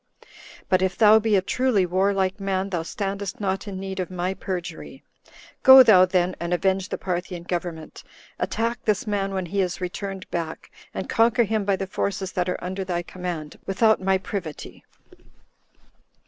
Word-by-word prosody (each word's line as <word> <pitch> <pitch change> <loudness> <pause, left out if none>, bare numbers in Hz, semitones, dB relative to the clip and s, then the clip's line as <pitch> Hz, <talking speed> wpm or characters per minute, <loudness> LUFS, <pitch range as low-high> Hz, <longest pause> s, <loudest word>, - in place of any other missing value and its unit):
But 185 0 +2
if 190 0 0
thou 215 0 +7
be 220 -1 +1
a 190 - +2
truly 245 -3 +1
warlike 190 +1 0
man, 195 0 -2
thou 175 -3 -1
standest 200 +5 -4
not 195 0 -2
in 190 -2 -5
need 190 0 -5
of 185 - -2
my 180 0 -2
perjury. 185 -2 -6 0.6
Go 265 -1 +10
thou 195 -6 +7
then, 180 -1 0
and 170 +1 -1
avenge 190 +1 0
the - - -3
Parthian 180 -1 -4
government; 170 -3 -5 0.4
attack 235 +1 -2
this 210 -2 0
man, 200 -2 -1
when 190 -1 -2
he 195 +3 -1
is 180 -1 -2
returned 190 +1 -5
back, 165 -2 -5 0.2
and - - -5
conquer 235 +1 +3
him 215 -1 -1
by 200 -1 +2
the 195 - -4
forces 190 0 -3
that 180 -1 -1
are - - -3
under 190 +2 -3
thy 175 -2 -2
command, 175 -4 -6
without 220 +2 +3
my 190 0 +2
privity." 185 -5 -7
190 Hz, 170 wpm, -24 LUFS, 180-200 Hz, 0.6 s, Go